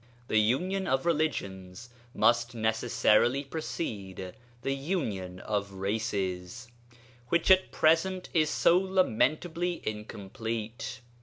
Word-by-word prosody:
The 110 - +4
union 180 - +1
of 135 -1 +1
religions 120 - -2 0.2
must 120 +1 +3
necessarily 110 +3 +2
precede 100 - -5 0.3
the 135 - 0
union 115 - -3
of 100 -2 -2
races, 100 +1 -3 0.6
which 170 +7 +3
at 190 0 +5
present 180 +4 +2
is 155 -2 +3
so 175 +2 +4
lamentably 175 - +1
incomplete. 110 +4 -5
120 Hz, 95 wpm, -29 LUFS, 105-160 Hz, 0.6 s, at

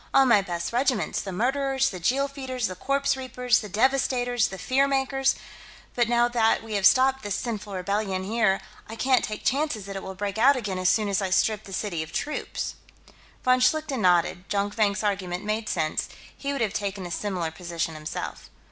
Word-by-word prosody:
"All 270 - +7
my 235 -5 +5
best 175 0 -4
regiments: 245 - +1
the 195 - -6
Murderers, 265 +6 +1
the 185 - -6
Jeel 265 +10 +1
Feeders, 260 -3 -4
the 185 - -2
Corpse 275 +9 0
Reapers, 250 -2 +1
the 210 - -7
Devastators, 245 +1 +2
the 190 - -7
Fear 270 +6 +2
Makers. 270 0 +1 0.6
But, 240 -2 +1
now 240 0 +4
that 230 -2 +2
we 225 -1 -7
have 200 -1 +5
stopped 265 +1 +4
this 205 -2 -2
sinful 210 -4 -4
rebellion, 190 0 -1
here, 210 -1 +1 0.3
I 225 - -6
can't 255 +2 +2
take 215 -1 -5
chances 270 -7 0
that 195 0 -7
it 195 - -4
will 190 0 -7
break 200 +2 -3
out 275 +5 +6
again 205 -7 -3
as 185 0 +3
soon 215 -2 +2
as 200 0 0
I 190 - -1
strip 210 +3 +1
the 195 - -11
city 185 -4 -2
of 160 - -7
troops." 300 - -3 0.7
Von 255 0 +4
Schlichten 280 -1 +1
nodded. 180 0 +2
Jonkvank's 205 0 0
argument 190 -2 -2
made 215 +1 -2
sense; 155 -2 -1 0.3
he 280 - -3
would 275 -3 -2
have 215 -3 0
taken 200 -3 -3
a 175 - -6
similar 180 -3 -2
position, 165 -1 -4
himself. 155 0 -6
215 Hz, 195 wpm, -26 LUFS, 190-255 Hz, 0.7 s, All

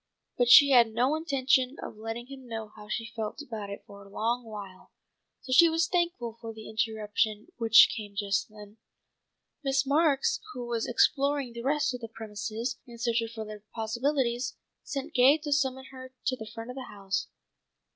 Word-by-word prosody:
But 245 -1 +2
she 280 +3 +9
had 235 -3 +6
no 250 +5 +2
intention 275 -4 +1
of - - -7
letting 225 +2 -6
him 265 -1 -11
know 225 -2 -5
how 210 -1 -12
she 225 +1 -4
felt 220 +2 -4
about 225 -8 -6
it 200 - -7
for 200 0 -13
a 200 - -15
long 235 +4 -1
while, 205 -4 -10 0.5
so 260 - -9
she 335 +6 +7
was 330 +1 +1
thankful 335 -11 -1
for 225 -1 -6
the 220 -1 -10
interruption 215 +1 -1
which 225 -1 +7
came 205 -3 -7
just 200 -1 -1
then. 210 0 -13 0.9
Miss 270 0 +1
Marks, 300 - +2
who 245 - -5
was 235 -1 -2
exploring 275 +1 +2
the 235 - -6
rest 290 +2 +1
of 250 - -6
the 230 - -5
premises 220 +2 -5
in 235 -1 -11
search 235 0 +1
of 230 - -4
further 215 -2 -8
possibilities, 240 +1 -1 0.3
sent 290 +2 -5
Gay 260 +4 +6
to 300 -2 -2
summon 265 -2 0
her 260 -1 -11
to 260 - +1
the 220 -3 -9
front 230 +2 -7
of - - -10
the 260 -1 -6
house. 195 -1 -3
235 Hz, 185 wpm, -28 LUFS, 220-270 Hz, 0.9 s, she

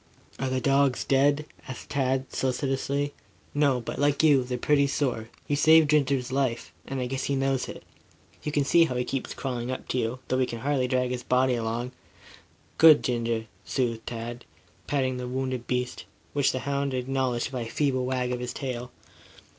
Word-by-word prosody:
"Are 135 - -1
the 130 0 0
dogs 140 -1 +2
dead?" 145 +2 +3 0.2
asked 130 -2 -8
Tad 135 -1 0
solicitously. 135 +2 -1 0.4
"No. 145 -3 +3
But, 115 - -6
like 145 +1 +2
you, 145 -4 +5
they're 125 0 -3
pretty 140 +3 +3
sore. 125 -6 -1 0.2
You 145 - +1
saved 155 +1 +6
Ginger's 135 -4 +2
life, 130 -3 -1
and 135 -1 -3
I 125 - -1
guess 135 +1 -3
he 140 - 0
knows 135 -1 0
it. - - -8 0.6
You 150 - -3
can 145 -1 +2
see 165 +4 +5
how 130 - -3
he 125 - +1
keeps 135 +1 -4
crawling 125 -2 -3
up 130 - -4
to 130 - 0
you, 115 +2 -1
though 130 - +1
he 130 - +2
can 115 -1 -6
hardly 140 -2 +1
drag 125 -1 +1
his 125 -1 -3
body 125 +1 +2
along." 120 +1 -2 0.9
"Good 160 -2 +8
Ginger," 115 -2 -1 0.2
soothed 115 -4 -2
Tad, 120 +1 -5 0.4
patting 130 -3 0
the 125 0 -4
wounded 130 -1 -3
beast, 125 0 -2 0.3
which 140 -2 +3
the 130 - -3
hound 140 -1 -1
acknowledged 130 -1 -1
by 130 -2 -3
a 115 - -5
feeble 130 -3 0
wag 125 -1 -1
of 125 0 -2
its 125 - -4
tail. 125 -3 -4
130 Hz, 185 wpm, -27 LUFS, 125-140 Hz, 0.9 s, Good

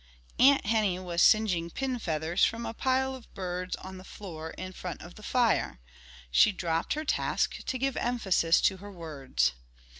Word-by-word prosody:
Aunt 275 -2 +6
Henny 210 -4 +2
was 175 -2 -2
singeing 185 -6 +4
pin 260 +5 -3
feathers 160 -1 -1
from 230 +1 +2
a - - -4
pile 265 +2 +1
of 260 -2 -11
birds 180 -1 -3
on 190 0 -9
the - - -11
floor 165 -5 -8
in 185 +2 -7
front 180 -3 -6
of 175 +1 -11
the - - -14
fire. 225 - +1 0.5
She 210 - +6
dropped 170 -4 -1
her 310 +1 -4
task - - 0
to 260 - -2
give 270 +1 -1
emphasis 195 -9 +2
to 190 - +2
her 205 +2 -10
words. 140 - -1
190 Hz, 175 wpm, -29 LUFS, 170-235 Hz, 0.5 s, Aunt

